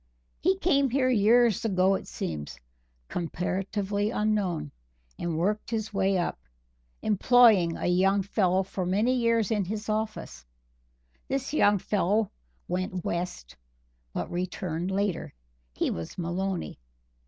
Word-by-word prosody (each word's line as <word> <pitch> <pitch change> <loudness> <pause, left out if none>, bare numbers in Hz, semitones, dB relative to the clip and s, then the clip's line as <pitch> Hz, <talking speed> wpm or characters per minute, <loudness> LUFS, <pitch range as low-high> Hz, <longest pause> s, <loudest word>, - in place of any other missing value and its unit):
He 375 +2 +2
came 280 -8 +2
here 255 +1 +2
years 230 0 +4
ago 190 -3 +3
it 195 - -3
seems, 75 -5 -5 0.5
comparatively 195 +4 -2
unknown, 210 - -1 0.5
and 170 -2 -2
worked 205 +6 -1
his 220 -1 -3
way 195 -1 +2
up, 175 - -2 0.6
employing 215 -5 +5
a - - -4
young 190 +3 +3
fellow 190 -1 +1
for 190 0 -4
many 205 +8 +2
years 230 -4 +2
in 210 -3 +1
his 215 +3 -5
office. 215 - -3 0.8
This 270 +1 -2
young 205 -8 +4
fellow 205 +2 0 0.4
went 185 0 -3
West, 170 - -4 0.6
but 90 - -4
returned 180 -1 -3
later. 195 - -2 0.4
He - - 0
was 80 -1 -6
Maloney. 180 - -3
195 Hz, 120 wpm, -27 LUFS, 180-220 Hz, 0.8 s, employing